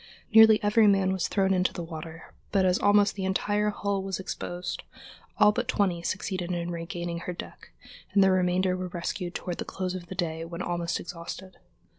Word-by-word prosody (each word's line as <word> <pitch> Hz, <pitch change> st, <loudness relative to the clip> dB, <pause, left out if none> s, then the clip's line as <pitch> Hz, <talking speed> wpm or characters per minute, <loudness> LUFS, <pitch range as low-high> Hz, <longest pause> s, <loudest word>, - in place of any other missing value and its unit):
Nearly 220 Hz, -1 st, +8 dB
every 210 Hz, +1 st, +5 dB
man 195 Hz, -2 st, +3 dB
was 190 Hz, -2 st, -1 dB
thrown 195 Hz, -1 st, +2 dB
into 180 Hz, 0 st, +1 dB
the 175 Hz, -, -5 dB
water, 165 Hz, 0 st, -9 dB, 0.2 s
but 195 Hz, -2 st, +3 dB
as 180 Hz, 0 st, +3 dB
almost 205 Hz, 0 st, +4 dB
the 195 Hz, -, -5 dB
entire 205 Hz, +2 st, +1 dB
hull 200 Hz, -1 st, -2 dB
was 190 Hz, -2 st, -4 dB
exposed, 180 Hz, -1 st, -5 dB, 0.6 s
all 210 Hz, -, +6 dB
but 235 Hz, +3 st, -2 dB
twenty 195 Hz, -8 st, +1 dB
succeeded 185 Hz, 0 st, -3 dB
in 175 Hz, 0 st, -2 dB
regaining 170 Hz, 0 st, -4 dB
her 180 Hz, +1 st, -5 dB
deck, 175 Hz, -, -10 dB, 0.4 s
and 200 Hz, -, +6 dB
the 190 Hz, -, +5 dB
remainder 185 Hz, 0 st, +2 dB
were 185 Hz, 0 st, -4 dB
rescued 175 Hz, 0 st, -4 dB
toward 175 Hz, -2 st, -4 dB
the -, -, -1 dB
close 185 Hz, -1 st, -4 dB
of 180 Hz, -2 st, -7 dB
the 190 Hz, -, -7 dB
day 165 Hz, -3 st, -2 dB
when 170 Hz, +2 st, -6 dB
almost 175 Hz, 0 st, -2 dB
exhausted. 180 Hz, +2 st, -8 dB
185 Hz, 190 wpm, -27 LUFS, 175-195 Hz, 0.6 s, Nearly